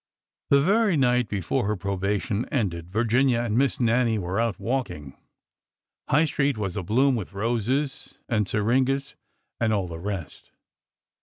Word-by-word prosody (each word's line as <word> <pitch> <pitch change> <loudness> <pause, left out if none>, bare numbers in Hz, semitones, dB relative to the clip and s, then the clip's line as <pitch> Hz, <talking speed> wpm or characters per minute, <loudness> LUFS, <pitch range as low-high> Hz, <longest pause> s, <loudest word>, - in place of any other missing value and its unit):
The 140 - +6
very 200 +3 +3
night 125 -3 +2
before 100 -1 -1
her 105 - 0
probation 100 +3 -2
ended 90 - -2
Virginia 120 +3 +2
and 115 -3 -1
Miss 135 +2 +1
Nannie 120 -1 +2
were 95 +1 -2
out 115 -3 -1
walking. 115 - -3 0.9
High 150 +4 +4
Street 140 -3 0
was 100 -4 -3
abloom 115 +8 +2
with 105 -4 -5
roses 120 +7 -2
and 105 -4 0
syringas 130 +7 0 0.4
and 110 -2 +1
all 100 -4 0
the 80 -1 -7
rest. 95 -5 -6
115 Hz, 140 wpm, -25 LUFS, 100-130 Hz, 0.9 s, The